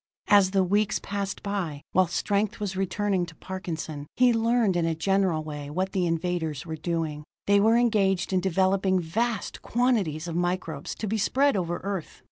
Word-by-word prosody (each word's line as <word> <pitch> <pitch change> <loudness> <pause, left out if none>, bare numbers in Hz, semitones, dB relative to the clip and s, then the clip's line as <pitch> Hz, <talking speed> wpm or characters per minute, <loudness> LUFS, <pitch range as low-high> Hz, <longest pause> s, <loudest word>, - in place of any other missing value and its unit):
As 200 -3 +6
the 190 0 +2
weeks 205 +3 +1
passed 200 -1 -4
by, 180 -8 -3
while 185 0 +4
strength 200 +4 -1
was 200 -2 -3
returning 195 0 0
to 165 - -12
Parkinson, 165 -6 -6
he 250 -1 +5
learned 230 -3 +2
in 175 - +1
a 165 -1 0
general 185 -2 +1
way 150 -2 -6
what 185 +5 -2
the 185 -3 0
invaders 165 -3 -2
were 160 -1 -4
doing. 160 -2 -3 0.2
They 200 0 +4
were 225 +3 +4
engaged 195 -6 +2
in 185 - +4
developing 190 +1 +2
vast 220 +7 -2
quantities 210 -11 0
of 165 - -4
microbes 175 -4 -2
to 215 - -4
be 220 +2 -1
spread 275 +5 +2
over 175 -2 -1
Earth. 195 -4 -4
190 Hz, 175 wpm, -26 LUFS, 165-205 Hz, 0.2 s, As